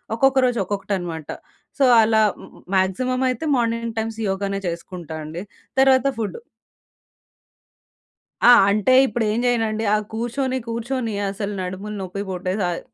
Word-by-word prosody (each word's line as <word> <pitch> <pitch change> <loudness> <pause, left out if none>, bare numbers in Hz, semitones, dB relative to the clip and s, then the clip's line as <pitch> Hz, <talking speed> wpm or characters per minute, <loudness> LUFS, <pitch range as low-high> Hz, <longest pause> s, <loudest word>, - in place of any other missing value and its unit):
ఒక్కొక్క 270 +2 +3
రోజు 245 -2 0
ఒక్కొక్కటనమాట. 185 -6 -4 0.5
సో 280 - +2 0.2
అలా 220 0 +3 0.5
మ్యాక్సిమమ్ 255 +8 +1
అయితే 255 +5 -3
మార్నింగ్ 230 -1 -1
టైమ్స్ 220 0 -3
యోగానే 195 +1 -2
చేసుకుంటా 170 -1 -6
అండి. 160 +4 -6 0.4
తర్వాత 265 0 +5
ఫుడ్. 220 - -3 2.1
ఆ! - - +10 0.2
అంటే 215 +5 +2
ఇప్పుడేం 220 0 -1
జేయనండి? 225 -2 0
ఆ - - +4 0.2
కూర్చొని 245 +3 -2
కూర్చొని 235 0 -3 0.2
అసలు 200 +1 -4
నడుములు 190 +3 -5
నొప్పి 190 +2 -5
పుట్టేశాయి. 185 -1 -2
220 Hz, 115 wpm, -22 LUFS, 190-240 Hz, 2.1 s, ఆ